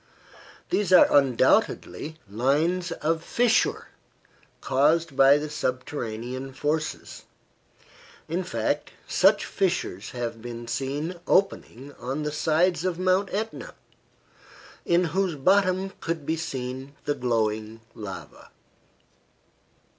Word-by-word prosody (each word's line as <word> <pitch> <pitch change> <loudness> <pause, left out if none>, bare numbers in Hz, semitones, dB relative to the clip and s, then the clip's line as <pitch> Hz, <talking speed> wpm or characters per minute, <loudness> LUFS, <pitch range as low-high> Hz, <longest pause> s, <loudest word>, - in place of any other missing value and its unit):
These 205 -2 +1
are 180 - +7
undoubtedly 140 +3 +2
lines 145 - 0
of 160 +1 -1
fissure, 240 +4 +1 0.7
caused 150 +2 +2
by 135 +1 +6
the 150 +1 -3
subterranean 130 -2 -4
forces. 150 +3 -3 1.0
In 175 +4 -2
fact, 180 - -2
such - - +4
fissures 175 - -2
have 120 -2 -5
been 120 0 -7
seen 140 +8 -3
opening 145 - 0
on 135 +5 -3
the 150 - -2
sides 160 +3 +1
of 185 -2 -1
Mount 185 +2 +1
Etna, 220 +3 -4 1.1
in 175 +1 +3
whose 180 0 0
bottom 190 +4 +2
could 165 -3 -3
be 160 - 0
seen 130 -3 -5
the 145 - +1
glowing 110 -4 -1
lava. 105 -3 -9
150 Hz, 100 wpm, -26 LUFS, 125-175 Hz, 1.1 s, are